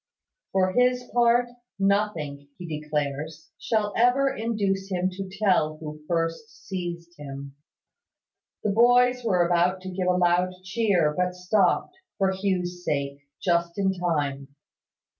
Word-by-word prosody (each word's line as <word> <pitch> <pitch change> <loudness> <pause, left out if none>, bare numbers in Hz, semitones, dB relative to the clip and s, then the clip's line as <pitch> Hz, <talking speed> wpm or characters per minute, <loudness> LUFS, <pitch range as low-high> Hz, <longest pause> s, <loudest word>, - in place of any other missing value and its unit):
For 185 -1 +2
his 250 +1 +3
part, 240 0 +4 0.3
nothing, 195 -8 0
he 180 - -8
declares, 150 0 -4
shall 210 -3 0
ever 270 +3 +3
induce 200 -4 -1
him 185 0 0
to 190 +1 -6
tell 185 -6 +1
who 150 -1 -8
first 165 +6 -3
seized 175 -2 -5
him." 140 -1 -8 1.1
The 210 - +1
boys 245 +3 +4
were 185 -6 +3
about 175 +2 +2
to 185 0 -6
give 180 0 -2
a 180 0 +3
loud 180 +1 +2
cheer, 185 -6 +1
but 180 +1 0
stopped, 180 - +1 0.2
for 195 -2 +2
Hugh's 180 -2 -2
sake, 140 -1 -3
just 170 -1 0
in 190 -1 +2
time. 145 -6 -1
180 Hz, 130 wpm, -26 LUFS, 165-205 Hz, 1.1 s, part